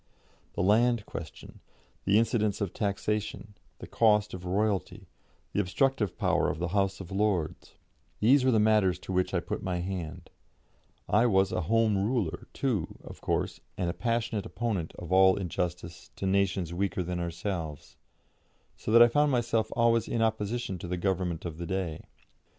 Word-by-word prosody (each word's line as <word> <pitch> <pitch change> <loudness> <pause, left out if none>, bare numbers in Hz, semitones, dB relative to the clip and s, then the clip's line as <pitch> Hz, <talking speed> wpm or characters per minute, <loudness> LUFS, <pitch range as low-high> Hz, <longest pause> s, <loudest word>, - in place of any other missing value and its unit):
The - - -1
land 115 +3 +3
question, - - -9 0.5
the 100 +2 +4
incidence 110 -3 +1
of 100 -4 -2
taxation, 105 +1 -2 0.2
the - - -9
cost 105 -2 +2
of 90 -1 -7
Royalty, 100 +1 -1 0.5
the - - 0
obstructive 105 -1 0
power - - +2
of - - -3
the 85 +1 -2
House 95 +1 0
of 95 - -10
Lords 95 -5 -1 0.4
these 130 +5 +5
were 130 - +3
the 115 -3 +4
matters 105 -4 +3
to 95 - -9
which 90 0 +1
I - - +1
put - - -4
my 90 -1 -2
hand; 90 -3 -5 0.8
I 110 +4 +4
was 95 -3 +3
a - - -1
Home 110 -3 +3
Ruler, 100 -7 -1
too, 115 -12 -2
of - - -11
course, - - -1 0.2
and 85 -1 0
a - - -7
passionate 115 -3 -1
opponent 100 -6 -2
of 85 - -8
all 95 0 +6
injustice 90 -2 -4
to - - -4
nations 95 -3 +1
weaker 95 0 -1
than 90 0 -3
ourselves, 85 -3 -4 0.8
so - - -5
that 115 +1 +9
I - - +7
found 145 +4 +2
myself 115 -3 0
always 115 -1 +3
in 115 - 0
opposition 110 -2 -1
to 90 - -6
the 90 +1 -2
Government 90 -3 -1
of 80 -1 -6
the 85 - -4
day. 90 -4 -3
100 Hz, 165 wpm, -29 LUFS, 90-110 Hz, 0.8 s, that